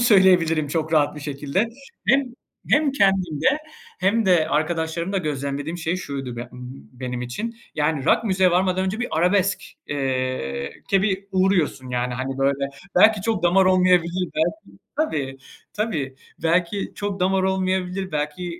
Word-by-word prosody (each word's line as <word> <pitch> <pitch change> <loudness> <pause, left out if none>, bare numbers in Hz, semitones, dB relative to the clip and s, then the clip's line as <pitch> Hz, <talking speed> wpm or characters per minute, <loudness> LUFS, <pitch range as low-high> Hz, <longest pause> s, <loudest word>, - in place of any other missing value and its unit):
söyleyebilirim 180 - +4
çok 160 +1 -2
rahat 150 -2 +3
bir - - -7
şekilde. 145 +9 -1 0.4
Hem 270 +4 +5 0.5
hem 300 -3 +3
kendimde 190 - +1 0.5
hem 205 +4 +2
de 175 -4 +4
arkadaşlarımda 165 +4 -1
gözlemlediğim 145 +1 -3
şey 165 +2 -1
şuydu 135 -8 -5
b - - -4
ımm, 125 +1 -10
benim 125 -1 -5
için, 215 - -5 0.2
yani, 150 -2 0
rock - - +3
müziğe 190 -3 +3
varmadan 185 +1 +2
önce 195 +5 -2
bir 245 - -1
arabesk 180 +2 +2 0.3
eee, 130 - -2 0.2
ke 195 -1 +4
bir 195 -1 0
uğruyorsun, 185 -8 +1
yani, 125 0 -1
hani, 130 +1 -4
böyle. 140 0 +1 0.3
Belki 215 -1 +6
çok 220 -4 -1
damar 180 +2 +4
olmayabilir, 180 -1 +3
belki 195 +6 -2 0.2
Tabii, 140 - -1 0.3
tabii. 160 -12 -2 0.3
Belki 175 +4 0
çok 200 -2 -4
damar 190 +1 +2
olmayabilir, 190 -1 -1
belki, 150 +4 -2
175 Hz, 140 wpm, -23 LUFS, 140-190 Hz, 0.5 s, Belki